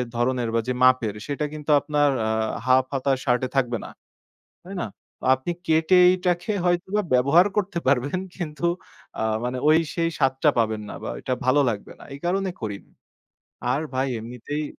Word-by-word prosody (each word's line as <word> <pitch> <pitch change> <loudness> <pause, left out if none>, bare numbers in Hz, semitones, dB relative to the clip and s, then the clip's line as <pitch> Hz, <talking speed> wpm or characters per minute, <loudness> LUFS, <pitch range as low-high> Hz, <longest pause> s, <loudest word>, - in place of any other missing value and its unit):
ধরনের 120 0 0
বা - - +3
যে 125 - 0
মাপের 130 -5 +4
সেটা 145 +1 -2
কিন্তু 150 0 -3
আপনার 145 0 +1 0.2
আ - - 0 0.4
হাফ 130 0 +4
হাতা 135 0 0
শার্ট 125 -2 +2
এ - - -16
থাকবে 125 -3 +1
না। - - -8 0.8
তাই 195 +2 -8
না? - - -1 0.5
আপনি 130 +6 -3 0.2
কেটে 160 +3 +3
এইটাকে 180 +1 0
হয়তোবা 180 +4 +1
ব্যবহার 140 +9 +5
করতে 200 -3 0
পারবেন 140 +6 +2 0.2
কিন্তু 160 -3 -6 0.6
আ - - 0 0.2
মানে 125 +1 -2 0.4
সেই 165 -1 +1
স্বাদটা 135 +2 +3
পাবেন 110 -2 +1
না - - -6
বা - - -4
এটা 130 - -2
ভালো 145 +3 +4
লাগবে 105 -3 -5
না। - - -12
এই 140 - -8
কারণে 190 +2 0
করিনি 105 -3 -6 0.8
আর 135 - +1
ভাই 130 +1 +1
এমনিতেই 125 +6 -5
140 Hz, 165 wpm, -24 LUFS, 125-170 Hz, 0.8 s, ব্যবহার